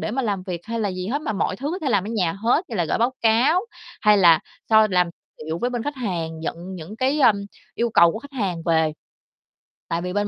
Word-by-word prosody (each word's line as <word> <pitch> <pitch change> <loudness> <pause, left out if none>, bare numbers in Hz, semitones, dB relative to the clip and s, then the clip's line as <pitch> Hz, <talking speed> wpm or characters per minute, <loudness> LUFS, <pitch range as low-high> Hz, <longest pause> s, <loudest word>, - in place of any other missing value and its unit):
để - - -3
mà 265 +4 -1
làm 200 -5 -1
việc 180 -3 -5
hay 230 0 -3
là 210 - 0
gì 185 0 -5
hết 285 +6 -2
mà 220 - -2
mọi 185 -1 -1
thứ 280 +6 -3
có 365 - -3
thể 310 - -2
làm 200 -4 +2
ở - - -5
nhà 185 -8 0
hết, 235 - +1
như 225 - -3
là 175 - +1
gởi 155 - -1
báo 240 +3 +2
cáo 235 +10 +4 0.4
hay 210 -1 +5
là 170 -4 +7 0.3
so 220 -1 +6
làm 180 -1 +3 0.4
liệu 160 +1 -3
với 245 +7 -1
bên 240 -2 -3
khách 290 +1 -4
hàng, 170 -9 -3
nhận 170 +3 -5
những 185 +5 -9
cái, 270 +5 +1
ưm, 200 -6 +4 0.3
yêu 235 0 0
cầu 170 -5 +5
của - - -5
khách 285 +4 -13
hàng 190 -10 -2
về. 160 -2 +2 1.0
Tại 165 0 -1
vì 180 +1 -4
bên 205 0 0
205 Hz, 255 wpm, -23 LUFS, 175-235 Hz, 1.0 s, là